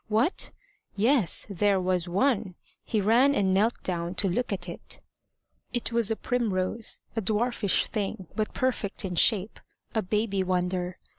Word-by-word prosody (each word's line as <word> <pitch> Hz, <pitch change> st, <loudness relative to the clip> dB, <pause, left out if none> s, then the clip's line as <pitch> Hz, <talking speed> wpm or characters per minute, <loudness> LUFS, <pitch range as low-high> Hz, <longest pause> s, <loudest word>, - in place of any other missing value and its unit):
What? 225 Hz, -, +1 dB, 0.5 s
Yes! 225 Hz, -, +3 dB
There 200 Hz, 0 st, +2 dB
was 180 Hz, -1 st, 0 dB
one! 200 Hz, -1 st, +1 dB, 0.3 s
He 220 Hz, -, -1 dB
ran 240 Hz, +8 st, +4 dB
and 190 Hz, -4 st, +2 dB
knelt 215 Hz, +5 st, +1 dB
down 175 Hz, 0 st, -2 dB
to 195 Hz, -, +1 dB
look 230 Hz, +7 st, -1 dB
at 185 Hz, -2 st, -2 dB
it. 170 Hz, -, -8 dB, 0.7 s
It 240 Hz, -1 st, -1 dB
was 230 Hz, -2 st, +1 dB
a 225 Hz, -, +1 dB
primrose 220 Hz, -3 st, -1 dB
a 225 Hz, -, 0 dB
dwarfish 215 Hz, 0 st, +1 dB
thing, 195 Hz, -3 st, -3 dB
but 215 Hz, -1 st, -1 dB
perfect 225 Hz, -6 st, 0 dB
in 180 Hz, -2 st, -3 dB
shape 205 Hz, +2 st, +3 dB, 0.3 s
a 220 Hz, -, +1 dB
baby 210 Hz, 0 st, 0 dB
wonder. 180 Hz, -1 st, -1 dB
205 Hz, 150 wpm, -27 LUFS, 185-230 Hz, 0.7 s, ran